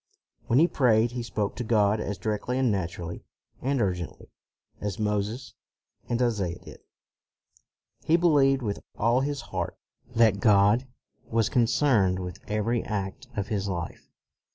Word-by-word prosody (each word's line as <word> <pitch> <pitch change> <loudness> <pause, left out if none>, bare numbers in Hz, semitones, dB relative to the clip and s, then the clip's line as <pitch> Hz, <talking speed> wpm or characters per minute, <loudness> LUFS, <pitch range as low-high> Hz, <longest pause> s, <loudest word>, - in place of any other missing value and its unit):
When 120 0 +3
he 165 +4 +6
prayed, 120 -6 +3
he 120 0 -4
spoke 105 -3 -2
to 125 - -2
God 110 -2 +2
as 100 -2 -3
directly 110 +6 -2
and 130 -3 +2
naturally 85 -3 -4 0.4
and 135 +1 0
urgently 90 -6 -3 0.5
as 100 -3 -3
Moses 105 +4 -2 0.6
and 120 - 0
Isaiah 105 -8 0
did. - - -13 1.3
He 165 - +4
believed 140 -6 +4
with 100 -3 -2 0.2
all 120 +3 +3
his 145 0 -2
heart - - -4 0.4
that 110 -3 +4
God 105 +5 +4 0.4
was 115 -1 +1
concerned 115 -6 +3
with 90 -2 -6
every 110 +3 0
act 100 +3 -4
of 100 -1 -3
his 100 -2 -1
life. 90 -4 -5
110 Hz, 140 wpm, -27 LUFS, 100-125 Hz, 1.3 s, he